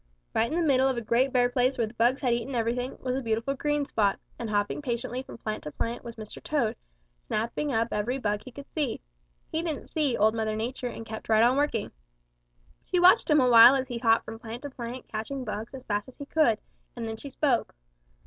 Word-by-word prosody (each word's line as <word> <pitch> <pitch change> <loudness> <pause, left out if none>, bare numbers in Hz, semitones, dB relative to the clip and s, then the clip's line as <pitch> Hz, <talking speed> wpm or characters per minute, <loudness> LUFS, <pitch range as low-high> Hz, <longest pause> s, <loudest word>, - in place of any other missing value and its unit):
Right 230 +1 +1
in 330 - 0
the 340 - +1
middle 265 -3 +4
of 260 - -1
a - - -1
great 235 +4 +2
bare 245 -1 +4
place 250 +1 +1
where 235 - +2
the 215 - -9
bugs 240 +3 +2
had 250 -3 +2
eaten 240 +3 -2
everything 240 +2 -1
was 255 -1 -1
a 270 - -1
beautiful 230 +3 -1
green 295 +1 0
spot, 205 -6 +1 0.2
and 230 - -4 0.3
patiently 245 -1 -3
hopping - - -5
from - - -11
plant 215 -1 -4
to 150 - -5
plant 230 +8 -3
was 235 -1 -8
Mr. 215 -2 -9
Toad, 275 -8 0 0.5
snapping 235 +7 -1
up 230 -1 +1
every 225 +5 -1
bug 210 -4 -1
he 255 - -10
could 280 +3 -10
see. 290 -7 -1 0.5
He 320 - 0
didn't 320 -4 -4
see 295 -6 0
Old 215 +1 +4
Mother 220 -1 -1
Nature 245 +3 -3
and 225 -2 -7
kept 220 0 -8
right 220 0 +5
on 245 +2 +4
working. 280 -6 0 0.9
She 360 - 0
watched 360 0 +6
him 300 -2 +5
a 255 - +4
while 240 +2 +9
as 265 -1 -1
he 240 -1 -3
hopped 230 -1 +3
from 225 - -8
plant 235 +2 -8
to 285 - -6
plant 245 0 -7
catching 240 +5 -4
bugs 220 +4 -5
as 260 - -9
fast 205 -1 -1
as 260 - -16
he 285 - -7
could, 290 -8 +3 0.4
and 235 -2 -4
then 220 - -4
she 280 - -8
spoke. 265 - 0
245 Hz, 235 wpm, -28 LUFS, 225-270 Hz, 0.9 s, while